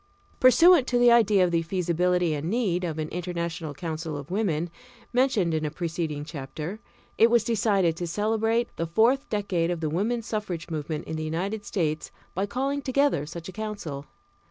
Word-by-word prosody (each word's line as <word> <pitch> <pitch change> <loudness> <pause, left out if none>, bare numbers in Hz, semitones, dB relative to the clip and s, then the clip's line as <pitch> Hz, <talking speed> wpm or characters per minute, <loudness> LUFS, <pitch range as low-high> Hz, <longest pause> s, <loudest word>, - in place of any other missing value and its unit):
Pursuant 270 +3 +6
to 245 - +1
the 240 0 +6
idea 215 -5 +5
of 180 - +1
the 170 -1 +2
feasibility 180 0 +1
and 150 +2 -3
need 195 -6 0
of 165 -3 -3
an 155 -1 -2
International 170 -2 -4
Council 160 -1 -4
of 145 +4 -9
Women, 175 -5 0 0.4
mentioned 245 -9 +2
in 155 0 0
a 150 - 0
preceding 160 -2 -3
chapter, 150 +6 -6 0.4
it 230 - +7
was 235 -2 +4
decided 200 -6 +2
to 175 - -3
celebrate 225 +5 0
the 165 - -2
fourth 230 +10 +2
decade 190 -5 0
of 175 -2 -1
the 155 -2 -2
woman 225 +8 0
suffrage 205 -7 -4
movement 155 0 -3
in 160 - -4
the 155 - -3
United 190 +7 -3
States 160 -5 -1 0.2
by 195 +3 -1
calling 275 +6 -1
together 270 - +1
such 170 +1 -8
a - - -6
council. 200 -10 -5
180 Hz, 180 wpm, -26 LUFS, 160-220 Hz, 0.4 s, it